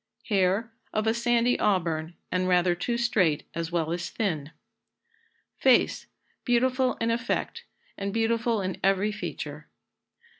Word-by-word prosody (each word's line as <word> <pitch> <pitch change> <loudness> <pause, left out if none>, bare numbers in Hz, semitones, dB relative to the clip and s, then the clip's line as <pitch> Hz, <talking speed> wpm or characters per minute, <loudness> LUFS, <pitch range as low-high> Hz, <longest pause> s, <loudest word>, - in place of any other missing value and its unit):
Hair. 200 +3 +2 0.2
Of 215 0 0
a 220 - +3
sandy 240 +1 +2
auburn, 170 -5 0 0.2
and 185 0 +1
rather 180 -1 +3
too 235 +7 -2
straight 190 -11 +2
as 165 0 -3
well 165 -2 0
as 175 0 -3
thin. 160 -10 -2 1.1
Face. - - +3 0.4
Beautiful 255 +1 +2
in 230 0 0
effect, 240 - -2 0.3
and 200 0 -2
beautiful 230 0 +1
in 185 0 -3
every 195 +2 +2
feature. 215 - -6
205 Hz, 125 wpm, -27 LUFS, 180-235 Hz, 1.1 s, a